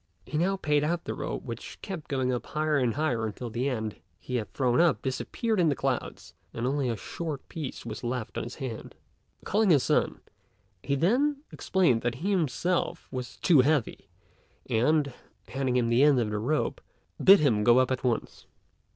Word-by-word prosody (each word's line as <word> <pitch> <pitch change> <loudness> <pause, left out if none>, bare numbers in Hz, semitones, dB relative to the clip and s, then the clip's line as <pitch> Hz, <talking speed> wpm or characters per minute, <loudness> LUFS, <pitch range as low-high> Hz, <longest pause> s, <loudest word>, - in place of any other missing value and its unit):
He - - -7
now 190 +3 +2
paid 150 -5 +1
out 170 +2 -1
the - - -4
rope - - -4
which 115 -3 -8
kept 185 -6 -6
going 130 -2 0
up 125 - -2
higher 155 -1 0
and 120 -3 +1
higher 130 -7 0
until 115 +2 -6
the 125 +5 -1
end 110 -5 -3 0.2
he 125 - -3
had 110 - -4
thrown 125 +2 +2
up 170 -4 +2
disappeared 210 - -1
in 170 -3 +4
the 140 - +1
clouds 135 -2 -3 0.2
and 115 - -2
only 135 0 0
a 115 - -2
short 155 +1 -6
piece 150 -7 -6
was 110 0 -6
left 120 -2 -3
in - - -2
his 120 - -7
hands. 130 -6 -6 0.5
Calling 215 0 +2
his 145 -7 +5
son, - - +1 0.6
he 140 - -1
then 275 - +1
explained 165 -12 +2
that 120 0 -1
he 185 +10 -2
himself 175 0 0
was 125 -2 -6
too 160 -7 +5
heavy, 145 -2 0 0.6
and, 140 +4 +2 0.4
handing 130 -2 -1
him 120 -2 +1
the 120 +2 +3
end 145 -3 +5
of 110 -3 -1
the 105 - -1
rope, 150 +8 -1 0.4
bid 195 +1 +9
him 115 -8 +2
go 120 +2 +6
up 130 0 +3
at 130 0 -2
once. 120 -3 -2
135 Hz, 190 wpm, -28 LUFS, 120-160 Hz, 0.6 s, bid